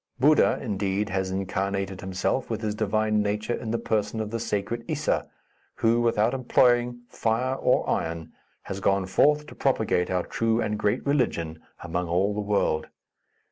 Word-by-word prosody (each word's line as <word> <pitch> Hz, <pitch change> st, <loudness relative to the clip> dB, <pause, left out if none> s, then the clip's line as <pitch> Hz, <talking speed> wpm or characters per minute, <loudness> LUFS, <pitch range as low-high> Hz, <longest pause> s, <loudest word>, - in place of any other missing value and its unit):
Buddha, 150 Hz, +4 st, +5 dB
indeed, 100 Hz, -2 st, -1 dB
has 95 Hz, 0 st, -1 dB
incarnated 95 Hz, 0 st, -2 dB
himself, 95 Hz, +7 st, -1 dB
with 110 Hz, -1 st, -3 dB
his 105 Hz, -2 st, -1 dB
divine 110 Hz, 0 st, +1 dB
nature, 105 Hz, +3 st, -1 dB
in 115 Hz, -, -4 dB
the 115 Hz, -, 0 dB
person 110 Hz, -1 st, -1 dB
of 110 Hz, -1 st, -3 dB
the 115 Hz, -, -2 dB
sacred 115 Hz, +2 st, -2 dB
Issa, 155 Hz, -1 st, -1 dB, 0.5 s
who, 115 Hz, +1 st, +2 dB
without 115 Hz, 0 st, +2 dB
employing 120 Hz, -1 st, +2 dB
fire 120 Hz, +4 st, 0 dB
or -, -, +1 dB
iron, 80 Hz, 0 st, -2 dB, 0.3 s
has 95 Hz, -, -5 dB
gone 95 Hz, -1 st, +1 dB
forth 150 Hz, +10 st, +3 dB
to -, -, -11 dB
propagate 110 Hz, -9 st, +1 dB
our 90 Hz, -1 st, 0 dB
true 115 Hz, 0 st, 0 dB
and 105 Hz, -2 st, -1 dB
great 105 Hz, -, 0 dB
religion 85 Hz, -, 0 dB, 0.2 s
among 85 Hz, +1 st, -2 dB
all 95 Hz, +5 st, +1 dB
the 105 Hz, -, -2 dB
world. 100 Hz, -7 st, 0 dB
105 Hz, 160 wpm, -26 LUFS, 95-115 Hz, 0.5 s, Buddha